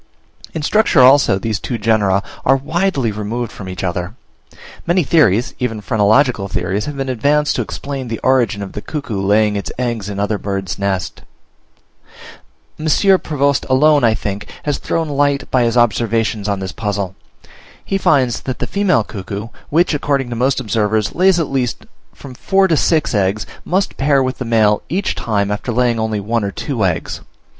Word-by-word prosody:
In 160 Hz, -, -3 dB
structure 210 Hz, -5 st, +3 dB
also 130 Hz, -5 st, +6 dB
these 110 Hz, +1 st, -2 dB
two 120 Hz, -, -4 dB
genera 105 Hz, -3 st, +2 dB, 0.2 s
are 135 Hz, -, +4 dB
widely 145 Hz, -, 0 dB
removed 110 Hz, +3 st, -4 dB
from 95 Hz, -2 st, -9 dB
each 90 Hz, 0 st, -6 dB
other. 90 Hz, +2 st, -3 dB, 0.7 s
Many 175 Hz, +1 st, +3 dB
theories, 125 Hz, -, +3 dB
even 115 Hz, -3 st, -2 dB
phrenological 110 Hz, +1 st, +2 dB
theories, 95 Hz, +2 st, -2 dB
have 150 Hz, -1 st, -6 dB
been 135 Hz, 0 st, -3 dB
advanced 145 Hz, +4 st, +1 dB
to -, -, +1 dB
explain 135 Hz, -2 st, -5 dB
the 115 Hz, -1 st, -3 dB
origin 120 Hz, -6 st, +2 dB
of 95 Hz, -, -7 dB
the 105 Hz, -, -6 dB
cuckoo 125 Hz, -10 st, -4 dB
laying 105 Hz, +1 st, +2 dB
its 100 Hz, -, -4 dB
eggs 115 Hz, -5 st, -2 dB
in 100 Hz, -1 st, -5 dB
other 105 Hz, 0 st, -1 dB
birds' 95 Hz, -5 st, -4 dB
nests. 95 Hz, -3 st, -2 dB, 1.6 s
M. 155 Hz, -, -3 dB, 0.3 s
Prevost 140 Hz, -2 st, 0 dB
alone, 145 Hz, +2 st, +4 dB
I 115 Hz, -2 st, +4 dB
think, 100 Hz, -1 st, -5 dB
has 145 Hz, -2 st, -1 dB
thrown 165 Hz, -1 st, -1 dB
light 145 Hz, -1 st, 0 dB
by 130 Hz, -, +3 dB
his 115 Hz, +1 st, 0 dB
observations 115 Hz, -2 st, +1 dB
on 100 Hz, -1 st, -1 dB
this 95 Hz, -1 st, -4 dB
puzzle: 100 Hz, -3 st, -3 dB, 0.7 s
he 195 Hz, -, -1 dB
finds 130 Hz, -, +2 dB
that 130 Hz, -, -4 dB
the -, -, -2 dB
female 200 Hz, -, +1 dB
cuckoo, 100 Hz, +1 st, -6 dB, 0.2 s
which, 170 Hz, +3 st, +2 dB
according 140 Hz, -3 st, -1 dB
to -, -, -3 dB
most 130 Hz, +4 st, +1 dB
observers, 110 Hz, -2 st, 0 dB
lays 185 Hz, 0 st, +3 dB
at 160 Hz, -, -2 dB
least 125 Hz, -3 st, -2 dB, 0.3 s
from 135 Hz, -, -11 dB
four 195 Hz, +9 st, +2 dB
to 165 Hz, -, +2 dB
six 155 Hz, -1 st, +1 dB
eggs, 100 Hz, 0 st, 0 dB, 0.2 s
must 190 Hz, +2 st, -1 dB
pair 140 Hz, -1 st, +3 dB
with 130 Hz, 0 st, -3 dB
the 130 Hz, -, -3 dB
male 110 Hz, -3 st, +3 dB
each 190 Hz, +6 st, -1 dB
time 100 Hz, -3 st, -1 dB
after 105 Hz, +4 st, -3 dB
laying 120 Hz, -1 st, +1 dB
only 110 Hz, -1 st, -1 dB
one 110 Hz, +2 st, -1 dB
or 100 Hz, -, -1 dB
two -, -, -3 dB
eggs. -, -, -2 dB
115 Hz, 175 wpm, -17 LUFS, 105-140 Hz, 1.6 s, also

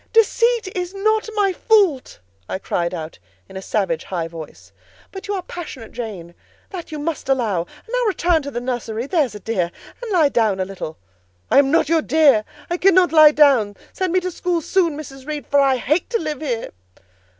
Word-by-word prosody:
"Deceit 460 Hz, -2 st, +2 dB
is 360 Hz, +1 st, -4 dB
not 435 Hz, +2 st, +1 dB
my 400 Hz, -2 st, +2 dB
fault!" 390 Hz, -, +2 dB, 0.3 s
I -, -, -2 dB
cried 170 Hz, -2 st, -2 dB
out 160 Hz, -, -7 dB, 0.3 s
in -, -, -14 dB
a 190 Hz, -, -5 dB
savage, 185 Hz, -5 st, -1 dB
high 170 Hz, -3 st, -3 dB
voice. 165 Hz, -2 st, -11 dB, 0.4 s
"But 385 Hz, +2 st, -8 dB
you 405 Hz, -, -1 dB
are 370 Hz, -, -4 dB
passionate, 295 Hz, -11 st, -8 dB
Jane, 195 Hz, -8 st, -7 dB, 0.4 s
that 350 Hz, -4 st, -7 dB
you 305 Hz, -, -4 dB
must 300 Hz, -2 st, -4 dB
allow: 230 Hz, -9 st, +1 dB, 0.3 s
and -, -, -35 dB
now -, -, 0 dB
return 350 Hz, -5 st, +2 dB
to 280 Hz, -, -6 dB
the 240 Hz, -3 st, -4 dB
nursery—there's 245 Hz, -, -1 dB
a -, -, -7 dB
dear—and 215 Hz, -, -4 dB
lie 325 Hz, -6 st, +4 dB
down 220 Hz, -7 st, +1 dB
a 185 Hz, -, 0 dB
little." 185 Hz, -5 st, -7 dB, 0.5 s
"I -, -, +7 dB
am 275 Hz, -1 st, +3 dB
not 315 Hz, 0 st, +3 dB
your 325 Hz, 0 st, +3 dB
dear; 285 Hz, -10 st, +4 dB, 0.2 s
I 345 Hz, -, -2 dB
cannot 370 Hz, -1 st, +4 dB
lie 310 Hz, -2 st, +8 dB
down: 270 Hz, -9 st, +4 dB, 0.2 s
send 375 Hz, -2 st, -1 dB
me 370 Hz, -, +3 dB
to 365 Hz, 0 st, -3 dB
school 350 Hz, 0 st, -1 dB
soon, 335 Hz, -5 st, +1 dB
Mrs. 270 Hz, -3 st, -10 dB
Reed, 300 Hz, -4 st, -4 dB
for 285 Hz, -, +2 dB
I 270 Hz, -1 st, +4 dB
hate 305 Hz, +7 st, 0 dB
to 470 Hz, -, +1 dB
live 305 Hz, -3 st, -4 dB
here." 245 Hz, -7 st, -3 dB
295 Hz, 195 wpm, -20 LUFS, 225-360 Hz, 0.5 s, lie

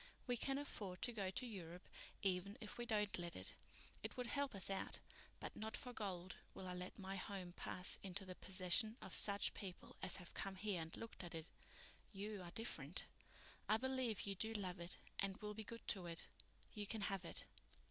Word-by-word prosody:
We 245 Hz, -, +3 dB
can 270 Hz, +3 st, +2 dB
afford 200 Hz, -10 st, -2 dB
to 240 Hz, -, +1 dB
go 200 Hz, -4 st, +1 dB
to 220 Hz, +7 st, -1 dB
Europe 180 Hz, -6 st, -5 dB, 0.4 s
even 195 Hz, +2 st, +3 dB
if 220 Hz, +1 st, -4 dB
we 240 Hz, -, -1 dB
don't 210 Hz, -4 st, +3 dB
let 170 Hz, -1 st, -2 dB
it. -, -, +1 dB, 0.5 s
It -, -, -3 dB
would 250 Hz, -, +1 dB
help 280 Hz, 0 st, +1 dB
us 190 Hz, -, 0 dB
out, 195 Hz, -, +2 dB, 0.4 s
but -, -, -3 dB
not 220 Hz, 0 st, -1 dB
for 250 Hz, -, -3 dB
gold 190 Hz, -4 st, -1 dB, 0.2 s
will 190 Hz, -, -4 dB
I 180 Hz, -, -1 dB
let 180 Hz, +1 st, -3 dB
my 195 Hz, 0 st, -2 dB
home 185 Hz, -2 st, -3 dB
pass 180 Hz, +1 st, +4 dB
into 195 Hz, 0 st, -2 dB
the 185 Hz, -, -3 dB
possession 185 Hz, +5 st, +4 dB
of -, -, -6 dB
such 200 Hz, -1 st, +6 dB
people 190 Hz, -4 st, -5 dB
as 180 Hz, -, +4 dB
have 180 Hz, -2 st, -7 dB
come 195 Hz, -1 st, -1 dB
here 190 Hz, -2 st, +2 dB
and 160 Hz, 0 st, -4 dB
looked 230 Hz, -4 st, -5 dB
at 170 Hz, -1 st, -4 dB
it. 160 Hz, 0 st, -3 dB, 0.6 s
You 205 Hz, 0 st, -2 dB
are 175 Hz, -, -4 dB
different. 170 Hz, -6 st, -1 dB, 0.6 s
I 215 Hz, -, +8 dB
believe 260 Hz, -3 st, +2 dB
you 200 Hz, -, +2 dB
do 220 Hz, +4 st, 0 dB
love 185 Hz, -4 st, 0 dB
it 170 Hz, +1 st, 0 dB, 0.2 s
and 195 Hz, 0 st, +2 dB
will 210 Hz, -2 st, -2 dB
be 220 Hz, +1 st, -3 dB
good 230 Hz, +2 st, -6 dB
to 185 Hz, -3 st, +2 dB
it. 165 Hz, -1 st, -3 dB, 0.5 s
You 205 Hz, -1 st, -1 dB
can 220 Hz, +1 st, 0 dB
have 195 Hz, -2 st, +1 dB
it." 170 Hz, -, +2 dB
195 Hz, 205 wpm, -45 LUFS, 180-220 Hz, 0.6 s, I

